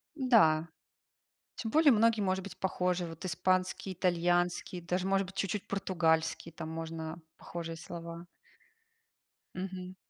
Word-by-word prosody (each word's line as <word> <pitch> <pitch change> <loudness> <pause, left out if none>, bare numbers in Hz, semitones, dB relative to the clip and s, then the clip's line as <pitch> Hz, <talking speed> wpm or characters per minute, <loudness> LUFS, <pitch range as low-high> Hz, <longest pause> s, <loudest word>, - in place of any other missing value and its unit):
Да, 215 - +4 0.9
тем 225 - -3
более 305 +2 +6
многие, 225 0 +4
может 190 -1 +1
быть, 200 - -9
похожи. 180 -1 0
Вот 165 +1 -9
испанский, 185 +1 0
итальянский, 175 0 +1
даже 180 +2 -1
может 195 0 +2
быть 190 +1 -12
чуть-чуть 195 +1 -1
португальский, 165 -4 +1
там 160 0 -6
можно 160 0 -5 0.2
похожие 165 -1 -6
слова. 170 +1 -8 1.3
Мгм. 185 0 -5
180 Hz, 120 wpm, -32 LUFS, 165-195 Hz, 1.3 s, более